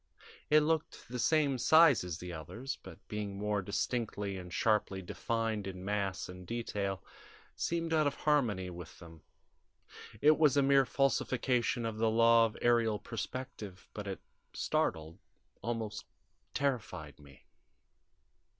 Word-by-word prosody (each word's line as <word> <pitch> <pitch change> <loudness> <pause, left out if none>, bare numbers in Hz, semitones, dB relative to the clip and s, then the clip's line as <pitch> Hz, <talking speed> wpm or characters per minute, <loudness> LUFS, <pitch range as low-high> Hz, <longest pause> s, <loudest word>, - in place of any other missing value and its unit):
It 150 0 +6
looked 160 +1 -1
the 125 0 -4
same 140 +1 +2
size 155 - +6
as 90 -3 -4
the 90 -1 -7
others, 115 - -6
but, 95 0 -13
being 105 -2 -4
more 105 0 0
distinctly 100 0 -2
and 90 -1 -8
sharply 100 -1 +1
defined 110 +2 -2
in 95 -1 -7
mass 100 -2 -1
and 90 0 -10
detail, 100 -4 -3 0.5
seemed 165 -1 -1
out 155 -2 +4
of 140 - -1
harmony 115 -12 +1
with 90 0 -9
them. 80 -2 -13 1.0
It 155 +1 +5
was 145 -3 +5
a 140 - +5
mere 135 -1 +5
falsification 125 -3 +1
of 110 -1 -3
the 115 0 +3
law 115 0 +5
of 105 - -10
aerial 115 -3 +3
perspective, 110 -4 -6
but 105 -1 -6
it 95 -3 -4 0.3
startled, 80 +3 -1 0.4
almost 115 -1 -3 0.5
terrified 115 - -2
me. 70 -2 -17
110 Hz, 135 wpm, -33 LUFS, 95-130 Hz, 1.0 s, It